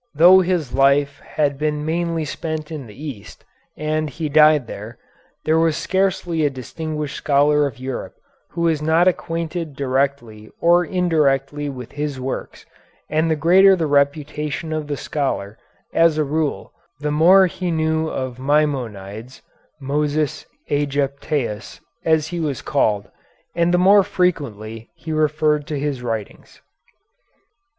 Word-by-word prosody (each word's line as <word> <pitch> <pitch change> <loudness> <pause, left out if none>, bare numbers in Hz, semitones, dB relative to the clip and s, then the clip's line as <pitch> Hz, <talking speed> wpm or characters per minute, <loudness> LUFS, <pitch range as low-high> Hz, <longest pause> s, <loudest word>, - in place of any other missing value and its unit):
Though 175 +5 +8
his 175 -7 -1
life 140 +1 +3
had 145 -3 -2
been 150 0 -1
mainly 165 0 -1
spent 155 +1 -5
in 145 -6 -6
the 105 +4 -14
East, 110 -9 -10 0.3
and 155 0 -1
he 155 +3 -4
died 150 -2 +5
there, 110 +2 -9 0.5
there 160 +1 +3
was 165 -2 +2
scarcely 185 -4 0
a 145 - +3
distinguished 150 +3 -5
scholar 145 0 +3
of 125 -5 -9
Europe 130 0 -5 0.3
who 170 - -5
was 165 -3 +1
not 160 +3 +3
acquainted 165 -3 -2
directly 130 -5 -2
or 175 +1 +4
indirectly 145 -5 0
with 125 -3 -8
his 145 -2 -4
works, 130 +1 -5 0.5
and 155 +2 +1
the 160 - +2
greater 185 +5 +6
the 165 -3 -1
reputation 150 +2 0
of 155 -1 -3
the 145 -1 -3
scholar, 125 -9 -3 0.3
as 165 -2 +4
a 155 - +2
rule, 150 0 -2 0.3
the 150 0 -2
more 180 +6 +6
he 180 0 -3
knew 160 -1 0
of 130 -4 -4
Maimonides, 130 -6 -2 0.4
Moses 145 +1 -1 0.2
Ægyptæus, 140 -4 -2 0.2
as 160 -2 +2
he 175 - -4
was 150 -5 -3
called, 105 -8 0 0.5
and 170 0 +1
the 180 - +3
more 195 +3 +6
frequently 130 - -2
he 160 - -6
referred 150 -1 +1
to 150 -2 -3
his 140 -3 -2
writings. 115 -4 -6
150 Hz, 140 wpm, -21 LUFS, 135-160 Hz, 0.5 s, Though